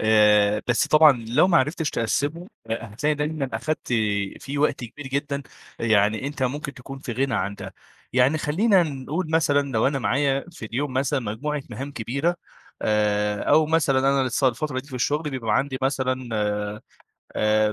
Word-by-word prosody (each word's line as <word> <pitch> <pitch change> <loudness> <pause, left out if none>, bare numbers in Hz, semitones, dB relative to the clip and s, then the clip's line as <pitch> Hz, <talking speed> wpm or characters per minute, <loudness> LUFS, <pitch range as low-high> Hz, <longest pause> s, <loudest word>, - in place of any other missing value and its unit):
آآ 105 -1 +4
بس 120 - +2
طبعًا 155 -1 +7 0.2
لو 145 +10 +4
ما 170 - +4
عرفتش 150 +3 0
تقسّمه 145 - -1 0.2
هتلاقي 115 +7 -1
دايمًا 150 -2 -2
أخَدت 155 0 -3 0.5
فيه 140 +1 -5
وقت 145 -4 +1
كبير 140 +5 -9
جدًا، 140 +1 -2 0.4
يعني 110 +1 +2
أنت 145 -1 -4
ممكن 140 +2 -2
تكون 135 +1 -9
في 135 -3 -6
غِنى 130 +1 0
عن 100 +1 -1
ده. 95 -1 -9 0.4
يعني 130 +5 +3
خلّينا 185 +6 +3
نقول 155 +3 -3
مثلًا 145 -3 +2
لو 110 +1 +2
أنا 140 0 0
معايا 135 +1 +1
في 160 -10 -10
اليوم 130 +5 -3
مثلًا 135 +2 0
مجموعة 135 +7 -3
مهام 135 +6 -6
كبيرة 140 +8 -1 0.5
آآ 105 -1 +1
أو 155 -1 +4
مثلًا 150 -4 +2
أنا 135 0 +3
الص 130 +1 -1
الفترة 130 +1 0
دي 140 - -18
في 135 - -9
الشغل 150 +5 0
بيبقى 115 -5 0
عندي 135 -1 -1
مثلًا 130 -2 -1 1.1
آآ 105 0 +2
135 Hz, 165 wpm, -24 LUFS, 115-150 Hz, 1.1 s, طبعًا